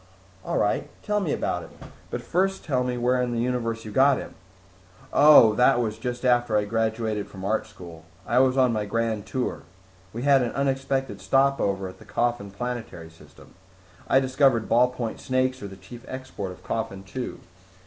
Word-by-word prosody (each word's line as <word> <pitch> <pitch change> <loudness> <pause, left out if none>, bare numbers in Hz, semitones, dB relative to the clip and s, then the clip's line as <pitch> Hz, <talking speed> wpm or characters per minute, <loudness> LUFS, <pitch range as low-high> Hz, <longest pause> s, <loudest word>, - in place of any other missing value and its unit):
"All - - -2
right, 105 - 0
tell 210 -1 0
me 180 -7 -2
about - - -1
it. - - -11 0.4
But - - -5
first 195 +2 0
tell 130 -5 0
me 125 -1 -2
where 125 +1 +1
in 125 -1 -1
the 115 - -1
universe 115 -2 -2
you 105 - -7
got 135 +4 +4
him." - - -7 0.8
"Oh, 145 -7 +8
that 125 +3 +4
was 110 -2 -2
just 125 +1 -4
after 120 -3 +3
I 105 - +1
graduated 110 -1 -1
from 95 -1 -9
art 110 +2 0
school. 85 -3 -12 0.2
I 120 +5 +2
was 130 0 +3
on 130 -3 +4
my 105 -1 -1
grand 110 -1 -2
tour. 130 -1 -3 0.5
We 120 +4 -5
had 140 -1 +5
an 120 - -2
unexpected 135 -1 -1
stopover 135 -9 +1
at 95 - -11
the - - -15
Coffin 120 -4 -1
planetary 110 -6 -6
system. 80 - -18 0.5
I 135 - +5
discovered 130 -3 +2
ballpoint 120 -1 +1
snakes 130 0 0
are 100 - -5
the 95 - -10
chief 105 +6 -12
export 130 -7 -6
of 90 - -13
Coffin 100 -4 -4
Two. 125 +6 -6
120 Hz, 180 wpm, -25 LUFS, 110-130 Hz, 0.8 s, Oh